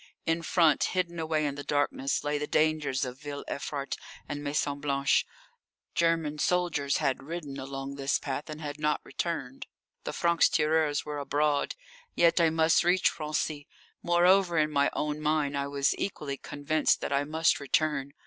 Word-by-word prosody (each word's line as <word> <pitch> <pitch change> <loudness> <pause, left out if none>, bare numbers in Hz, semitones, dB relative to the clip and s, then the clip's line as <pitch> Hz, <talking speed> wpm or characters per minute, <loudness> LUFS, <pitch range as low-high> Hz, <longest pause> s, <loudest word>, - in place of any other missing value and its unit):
In 165 +1 +1
front, 165 -3 +3
hidden 175 -2 -2
away 155 -1 0
in 145 - -1
the 145 0 -7
darkness, 145 -2 0
lay 145 0 -1
the 150 - -3
dangers 155 -4 +1
of 125 +1 -7
Ville 145 -1 -6
Evrart 140 0 -4 0.3
and 145 0 -5
Maison 145 0 -1
Blanche. 140 -1 +1 0.7
German 165 -3 +1
soldiers 160 -6 +1
had 135 - 0
ridden 145 -2 -6
along 135 +1 -5
this 140 0 +1
path 140 +2 -5
and 155 0 -6
had 145 0 -5
not 150 0 +1
returned; 135 -7 -4 0.4
the - - -3
francs 170 -1 +3
tireurs 155 -1 +1
were 150 -1 -4
abroad. 145 +1 0 0.4
Yet 170 0 +4
I 165 - +5
must 160 0 +3
reach 180 +2 +3
Raincy. 150 -1 -2 0.3
Moreover, 175 +1 +4
in 155 0 +2
my 140 -1 +3
own 150 0 -2
mind, 150 -2 +1
I 140 0 -1
was 140 0 +1
equally 150 -8 -3
convinced 145 +3 0
that - - -2
I 140 +1 +2
must 160 +3 +2
return. 140 -1 0
150 Hz, 165 wpm, -29 LUFS, 140-160 Hz, 0.7 s, I